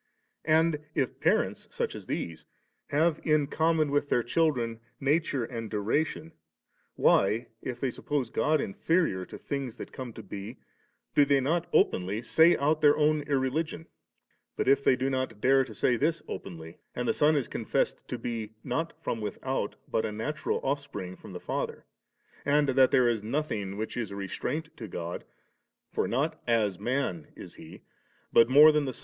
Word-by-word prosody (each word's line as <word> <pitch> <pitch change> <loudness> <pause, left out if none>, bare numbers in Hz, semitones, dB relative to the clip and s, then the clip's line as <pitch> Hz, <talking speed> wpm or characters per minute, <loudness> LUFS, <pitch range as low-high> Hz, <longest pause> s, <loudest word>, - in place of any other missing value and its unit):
And 160 -1 +3 0.2
if 130 - -1
parents, - - +1
such - - -2
as - - -9
these, 80 -1 -4 0.4
have 155 +2 +2
in 155 -2 +3
common 160 0 +1
with 145 0 +1
their 120 - +2
children 120 -5 0 0.2
nature 145 -2 +1
and 115 -2 -6
duration, 145 +10 -1 0.6
why, 105 +5 +3
if 120 -2 -5
they 130 -1 -1
suppose 135 -2 -2
God 155 0 +2
in 100 - -3
ferior 160 - +1
to - - -8
things 135 -5 -4
that - - -8
come 130 -2 -6
to 115 - -9
be^ 100 +4 -7 0.6
do 145 - +6
they 140 -1 +3
not 165 +6 0
openly 100 +5 +2
say 160 +8 +5
out 155 +2 +1
their 145 -1 +6
own 155 0 +3
irreligion? 145 +4 -1 0.7
But - - -1
if 140 +1 +4
they 130 - +5
do 130 +1 -1
not 130 -5 -2
dare 135 +3 +4
to - - -11
say 125 - +2
this 160 +6 0
openly, 80 -3 -8 0.2
and 125 0 -2
the - - +3
Son 150 +1 +3
is 140 -4 0
confessed - - -1
to 125 - -4
be, 115 -2 -4
not 140 +6 -2
from 115 - -2
without, 105 +2 -3
but 110 - 0
a - - -2
natural 145 +9 -2
offspring 135 -10 -3
from 105 - -12
the 90 - -6
Father, - - -4 0.6
and 145 0 +3
diat 130 0 +5
there 125 -1 +4
is 115 -3 +1
nothing 110 -5 -2
which 110 +1 -4
is 115 -4 -2
a 100 - -7
restraint 135 - -4
to 110 - -7
God 85 -2 -5 0.7
(for - - 0
not 140 +6 -1
as 110 -6 +1
man 125 - -1
is - - -10
He, - - -13 0.5
but 115 +1 +6
more 150 +4 +9
than 150 -1 +1
the. 130 - -5
130 Hz, 175 wpm, -29 LUFS, 110-150 Hz, 0.7 s, more